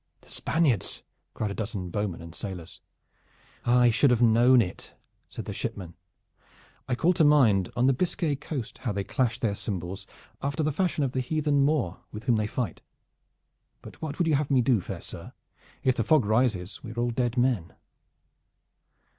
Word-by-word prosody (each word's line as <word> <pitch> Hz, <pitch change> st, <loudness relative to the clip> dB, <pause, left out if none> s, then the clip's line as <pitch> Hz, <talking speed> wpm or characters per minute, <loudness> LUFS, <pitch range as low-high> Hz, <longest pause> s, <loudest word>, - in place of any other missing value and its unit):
"The -, -, -20 dB
Spaniards!" 155 Hz, -, 0 dB, 0.3 s
cried 105 Hz, -2 st, -2 dB
a -, -, -3 dB
dozen 100 Hz, -5 st, -4 dB
bowmen 100 Hz, -4 st, -3 dB
and 85 Hz, 0 st, -10 dB
sailors. 90 Hz, -4 st, -7 dB, 0.8 s
"I 120 Hz, 0 st, +5 dB
should 130 Hz, +5 st, +4 dB
have 120 Hz, -2 st, +3 dB
known 120 Hz, +2 st, +6 dB
it," 95 Hz, -6 st, -3 dB, 0.3 s
said -, -, -7 dB
the -, -, -5 dB
shipman. 90 Hz, -4 st, -5 dB, 0.9 s
"I 125 Hz, -, 0 dB
call 170 Hz, +8 st, +3 dB
to 165 Hz, -, +3 dB
mind 120 Hz, -, +4 dB
on 120 Hz, +1 st, +2 dB
the 135 Hz, -, +5 dB
Biscay 165 Hz, 0 st, 0 dB
Coast 140 Hz, -4 st, -6 dB
how 125 Hz, -5 st, -2 dB
they 100 Hz, -, -1 dB
would 100 Hz, -, -9 dB
clash 115 Hz, +1 st, 0 dB
their 110 Hz, -4 st, 0 dB
cymbals 95 Hz, -2 st, -5 dB, 0.3 s
after 140 Hz, +3 st, -1 dB
the 155 Hz, -, +1 dB
fashion 165 Hz, -1 st, 0 dB
of 135 Hz, -, 0 dB
the 130 Hz, -, -1 dB
heathen 145 Hz, +1 st, +1 dB
Moor 140 Hz, -, +1 dB
with 105 Hz, +1 st, -8 dB
whom 120 Hz, -3 st, +2 dB
they 105 Hz, -1 st, 0 dB
fight; 110 Hz, -5 st, -3 dB, 1.0 s
but -, -, -12 dB
what 155 Hz, -2 st, -4 dB
would 175 Hz, -, +1 dB
you 160 Hz, -, +3 dB
have 145 Hz, 0 st, +1 dB
me 130 Hz, -3 st, +3 dB
do, 115 Hz, -4 st, +3 dB
fair -, -, -6 dB
sir? -, -, -9 dB, 0.5 s
If 130 Hz, -1 st, +3 dB
the -, -, 0 dB
fog 155 Hz, -8 st, +4 dB
rises 110 Hz, -4 st, 0 dB
we 115 Hz, -, -7 dB
are 120 Hz, -, -5 dB
all 120 Hz, 0 st, +1 dB
dead 120 Hz, 0 st, -1 dB
men." 120 Hz, -9 st, +1 dB
120 Hz, 185 wpm, -27 LUFS, 105-140 Hz, 1.0 s, known